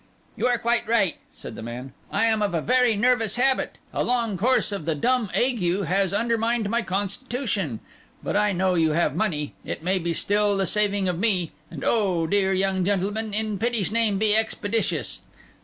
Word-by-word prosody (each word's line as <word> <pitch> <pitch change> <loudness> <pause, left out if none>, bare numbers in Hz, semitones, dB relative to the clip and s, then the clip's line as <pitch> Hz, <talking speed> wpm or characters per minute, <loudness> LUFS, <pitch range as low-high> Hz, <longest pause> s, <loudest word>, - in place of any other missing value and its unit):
'You - - 0
are 245 -1 +2
quite 235 0 0
right,' 215 -6 +2
said - - -10
the - - -8
man. 120 +3 -7 0.2
'I 200 +3 +2
am 220 -1 +2
of 200 -4 0
a - - +2
very 250 +2 +3
nervous 225 -1 +2
habit; 260 +2 +1 0.2
a - - 0
long 235 -4 0
course 235 +5 +1
of 195 -7 -4
the 160 -1 0
dumb 245 - +1
ague 245 -4 +1 0.2
has 190 +2 +1
undermined 230 0 0
my 235 +1 +1
constitution. 200 - -3 0.4
But - - -2
I 210 0 +3
know 185 0 +1
you 160 -3 +2
have 170 +2 +1
money; 155 -9 -1
it - - -6
may 185 +2 +1
be 170 -1 -2
still 205 +2 +1
the 195 - +1
saving 205 0 +1
of 175 -2 -1
me; 190 -6 +1 0.2
and - - -8
oh, 190 -7 +1
dear 195 +2 +1
young 190 0 +1
gentleman, 205 +3 -1
in 215 -1 -1
pity's 230 -5 0
name 220 -3 +2
be 210 +1 +2
expeditious! 220 0 -1
205 Hz, 190 wpm, -24 LUFS, 185-230 Hz, 0.4 s, very